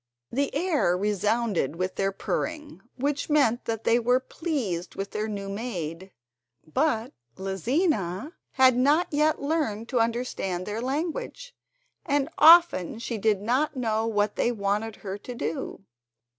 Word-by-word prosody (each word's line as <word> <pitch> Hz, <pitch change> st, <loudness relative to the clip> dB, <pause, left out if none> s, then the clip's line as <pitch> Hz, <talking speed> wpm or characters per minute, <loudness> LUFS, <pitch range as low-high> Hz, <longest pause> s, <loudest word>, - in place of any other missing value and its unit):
The 280 Hz, +3 st, 0 dB
air 295 Hz, -, +2 dB
resounded 210 Hz, -, 0 dB
with 185 Hz, +2 st, -2 dB
their 195 Hz, 0 st, 0 dB
purring, 300 Hz, -, -4 dB, 0.2 s
which 285 Hz, +3 st, -1 dB
meant 275 Hz, -6 st, +2 dB
that 225 Hz, -1 st, -3 dB
they 235 Hz, -, +3 dB
were 245 Hz, +2 st, +3 dB
pleased 260 Hz, -, -3 dB
with 195 Hz, 0 st, -4 dB
their 215 Hz, +1 st, -2 dB
new 200 Hz, -2 st, -5 dB
maid, 190 Hz, -4 st, -5 dB, 0.5 s
but 235 Hz, -, 0 dB, 0.2 s
Lizina 200 Hz, -, -1 dB, 0.2 s
had 260 Hz, -2 st, +5 dB
not 290 Hz, +7 st, +3 dB
yet 300 Hz, 0 st, +1 dB
learned 280 Hz, -8 st, -1 dB
to 250 Hz, -, +1 dB
understand 225 Hz, -6 st, -1 dB
their 210 Hz, +2 st, -4 dB
language, 345 Hz, -, -3 dB, 0.5 s
and 285 Hz, -1 st, 0 dB
often 320 Hz, -, +7 dB
she 230 Hz, -1 st, -4 dB
did 210 Hz, -1 st, +2 dB
not 260 Hz, +7 st, +1 dB
know 225 Hz, -3 st, 0 dB
what 210 Hz, -2 st, 0 dB
they 240 Hz, -, +2 dB
wanted 210 Hz, 0 st, -1 dB
her 195 Hz, +1 st, -4 dB
to 245 Hz, +4 st, -8 dB
do. 160 Hz, -, -4 dB
230 Hz, 140 wpm, -26 LUFS, 200-285 Hz, 0.5 s, often